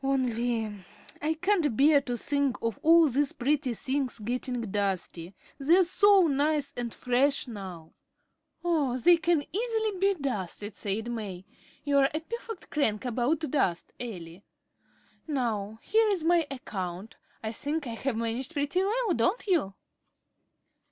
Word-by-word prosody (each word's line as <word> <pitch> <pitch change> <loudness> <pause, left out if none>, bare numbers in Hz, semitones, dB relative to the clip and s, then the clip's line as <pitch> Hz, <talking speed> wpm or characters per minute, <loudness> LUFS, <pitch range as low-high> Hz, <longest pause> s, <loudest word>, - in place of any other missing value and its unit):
"Only 245 -4 0 0.6
I 310 +2 0
can't 330 - +1
bear 285 +1 +6
to 245 -3 -3
think 280 +1 0
of 230 -3 -2
all 330 0 +6
these 280 +1 +1
pretty 275 -1 0
things 265 +1 -1
getting 245 +2 -2
dusty. 190 -3 -2 0.2
They're 335 +7 +5
so 390 +1 +5
nice 290 -1 +1
and 240 -1 -3
fresh 265 +4 +1
now." 185 -8 -8 0.7
"Oh, 295 -8 +1
they 345 +8 +6
can 330 -2 +1
easily 440 -3 -1
be 395 +1 +3
dusted," 210 -5 -3
said 215 +4 -3
May. 195 -6 -5 0.4
"You 285 -1 +3
are 270 0 +4
a - - +1
perfect 450 +2 -8
crank 220 -7 0
about 250 +6 0
dust, 265 - -1
Elly. 185 -6 -7 0.8
Now, 220 -7 -2
here 440 0 +3
is 380 -6 0
my 335 -2 +3
account. 195 -6 -6 0.3
I 220 - -2
think 290 +6 -3
I 240 - -4
have 235 +1 -2
managed 230 +6 -2
pretty 290 +4 0
well, 430 +1 +1
don't 240 - +1
you?" 320 - +1
270 Hz, 140 wpm, -28 LUFS, 225-320 Hz, 0.8 s, bear